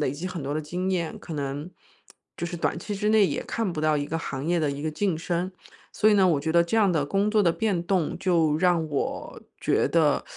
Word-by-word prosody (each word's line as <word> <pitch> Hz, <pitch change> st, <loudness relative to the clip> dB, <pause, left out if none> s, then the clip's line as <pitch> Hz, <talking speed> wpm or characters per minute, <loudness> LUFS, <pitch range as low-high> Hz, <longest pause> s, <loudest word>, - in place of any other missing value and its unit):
累 145 Hz, -, +1 dB
积 150 Hz, +7 st, -5 dB
很 180 Hz, -5 st, -5 dB
多 140 Hz, -, -3 dB
的 155 Hz, -, -1 dB
经 180 Hz, +5 st, -3 dB
验。 170 Hz, -4 st, -1 dB
可 170 Hz, -, -9 dB
能 145 Hz, +2 st, -4 dB, 0.7 s
就 170 Hz, -, -3 dB
是 175 Hz, -, -6 dB
短 170 Hz, -, -1 dB
期 205 Hz, +4 st, -5 dB
之 205 Hz, +1 st, -1 dB
内， 215 Hz, -2 st, +5 dB
也 -, -, -2 dB
看 225 Hz, -5 st, -2 dB
不 155 Hz, -, -3 dB
到 155 Hz, -1 st, +2 dB
一 145 Hz, -, -1 dB
个 165 Hz, +3 st, -3 dB
行 135 Hz, -4 st, -5 dB
业 175 Hz, 0 st, +2 dB
的 150 Hz, -2 st, +1 dB
一 140 Hz, +1 st, -5 dB
个 155 Hz, -, -1 dB
晋 185 Hz, +2 st, 0 dB
升。 175 Hz, +3 st, -2 dB, 0.4 s
所 215 Hz, -, +3 dB
以 -, -, +5 dB
呢， 195 Hz, -2 st, +5 dB
我 160 Hz, -5 st, +3 dB
觉 160 Hz, +3 st, -2 dB
得 170 Hz, 0 st, +5 dB
这 170 Hz, +6 st, -1 dB
样 205 Hz, -5 st, +4 dB
的 145 Hz, -3 st, 0 dB
工 200 Hz, +5 st, +1 dB
作 215 Hz, -1 st, +3 dB
的 170 Hz, -, +4 dB
变 190 Hz, -1 st, 0 dB
动， 180 Hz, -3 st, 0 dB
就 165 Hz, -5 st, +2 dB
让 175 Hz, -2 st, +2 dB
我 145 Hz, -2 st, -3 dB, 0.2 s
觉 -, -, +1 dB
得 155 Hz, -4 st, +3 dB
170 Hz, 270 characters per minute, -26 LUFS, 150-185 Hz, 0.7 s, 内